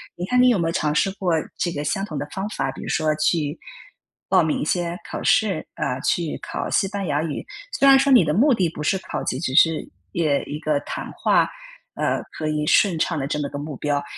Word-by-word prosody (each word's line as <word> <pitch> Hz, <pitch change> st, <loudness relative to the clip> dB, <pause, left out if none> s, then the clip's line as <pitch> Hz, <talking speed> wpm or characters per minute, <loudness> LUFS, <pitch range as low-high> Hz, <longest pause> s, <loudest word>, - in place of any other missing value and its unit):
你 175 Hz, -, -4 dB
看 250 Hz, +5 st, +3 dB
你 250 Hz, -, +6 dB
有 230 Hz, -, +3 dB
没 165 Hz, -2 st, 0 dB
有 -, -, 0 dB
尝 150 Hz, -2 st, 0 dB
试 190 Hz, +5 st, +2 dB
过 190 Hz, -4 st, -1 dB, 0.2 s
这 175 Hz, -, -1 dB
个 145 Hz, -2 st, -4 dB
相 195 Hz, +6 st, -1 dB
同 155 Hz, -7 st, -6 dB
的 145 Hz, -, -3 dB
方 195 Hz, +1 st, -3 dB
法， 135 Hz, -10 st, -2 dB
比 -, -, -10 dB
如 -, -, -7 dB
说 155 Hz, -1 st, +1 dB
去 155 Hz, 0 st, 0 dB, 0.7 s
报 185 Hz, -3 st, +5 dB
名 155 Hz, -, 0 dB
一 -, -, -1 dB
些 175 Hz, 0 st, -1 dB
考 -, -, -5 dB
试， 195 Hz, -7 st, +2 dB
啊， 125 Hz, +1 st, -2 dB
去 170 Hz, -3 st, 0 dB
考 -, -, -4 dB
西 195 Hz, -, +2 dB
班 200 Hz, -3 st, -4 dB
牙 145 Hz, +1 st, 0 dB
语？ 155 Hz, -3 st, -4 dB, 0.4 s
虽 275 Hz, -, +5 dB
然 270 Hz, -, +8 dB
说 275 Hz, +1 st, +2 dB
你 240 Hz, -, +7 dB
的 150 Hz, -, 0 dB
目 265 Hz, +5 st, +5 dB
的 185 Hz, -6 st, +2 dB
不 150 Hz, -1 st, -7 dB
是 190 Hz, -, +2 dB
考 -, -, -5 dB
级， -, -, -2 dB
只 130 Hz, -5 st, -2 dB
是 165 Hz, -1 st, +4 dB, 0.2 s
也 150 Hz, -4 st, +1 dB
一 150 Hz, -, -6 dB
个 155 Hz, -2 st, 0 dB
谈 -, -, -6 dB
话， -, -, +2 dB, 0.5 s
呃， -, -, 0 dB, 0.2 s
可 155 Hz, -, -2 dB
以 150 Hz, 0 st, -1 dB
顺 180 Hz, -6 st, +4 dB
畅 165 Hz, 0 st, 0 dB
地 135 Hz, -, -2 dB
这 150 Hz, +1 st, -2 dB
么 145 Hz, -, -2 dB
个 -, -, -6 dB
目 145 Hz, 0 st, -5 dB
标， 145 Hz, -1 st, -1 dB
165 Hz, 260 characters per minute, -23 LUFS, 150-190 Hz, 0.7 s, 然